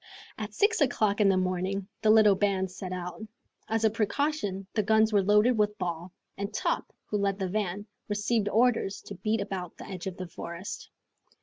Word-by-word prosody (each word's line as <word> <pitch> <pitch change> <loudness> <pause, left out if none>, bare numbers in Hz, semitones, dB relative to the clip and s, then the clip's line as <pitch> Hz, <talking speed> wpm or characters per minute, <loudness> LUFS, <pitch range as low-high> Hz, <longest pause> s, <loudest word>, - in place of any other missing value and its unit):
At - - -6
six 420 -2 +2
o'clock 215 -6 +2
in 200 - +5
the 190 - +3
morning 185 +1 -1
the 215 - +3
little 215 -2 +7
band 190 -1 0
set 185 0 -7
out. 180 -1 -5 0.5
As 225 0 0
a - - +6
precaution 220 -3 -1
the 215 - +2
guns 220 +1 +3
were 205 - +5
loaded 210 +4 +4
with 210 0 +1
ball, 175 -1 -4 0.3
and 200 +1 -3
Top, - - -1
who 210 - -2
led 200 -1 0
the 190 -2 -2
van, 200 0 -2 0.2
received 205 +1 +1
orders 230 -3 +2
to - - -9
beat 215 +3 -1
about 190 -4 -5
the - - -9
edge 185 -1 -6
of 190 -1 -5
the 185 - -5
forest. 170 +2 -7
200 Hz, 190 wpm, -28 LUFS, 185-215 Hz, 0.5 s, little